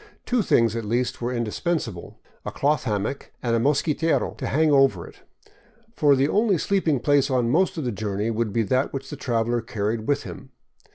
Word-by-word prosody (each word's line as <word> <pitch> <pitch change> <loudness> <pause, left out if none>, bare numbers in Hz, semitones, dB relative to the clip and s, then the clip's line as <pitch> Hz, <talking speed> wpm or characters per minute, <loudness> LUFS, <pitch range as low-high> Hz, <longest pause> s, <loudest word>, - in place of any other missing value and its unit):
Two 245 -2 +1
things 115 - +2
at 115 - -3
least 120 +4 -1
were 120 +1 -1
indispensable, 120 - -3
— - - -35
a - - -5
cloth 145 0 0
hammock 105 +4 -3
and 115 -2 +1
a - - +2
mosquitero 150 +5 +1
to - - -3
hang 155 +2 +2
over 135 -11 +3
it; - - -15 0.8
for 145 -9 +4
the 135 +1 +2
only 205 +2 +2
sleeping 165 -6 +1
place 145 +1 +2
on 125 -3 +1
most 180 +4 +2
of 155 - -2
the 125 - -1
journey 105 +1 -2
would 115 -1 -1
be 115 +2 +1
that 130 +5 0
which 135 0 -6
the - - -4
traveler 120 -3 -1
carried 110 -1 -3
with 145 - +1
him. 130 - -10
130 Hz, 195 wpm, -24 LUFS, 115-145 Hz, 0.8 s, for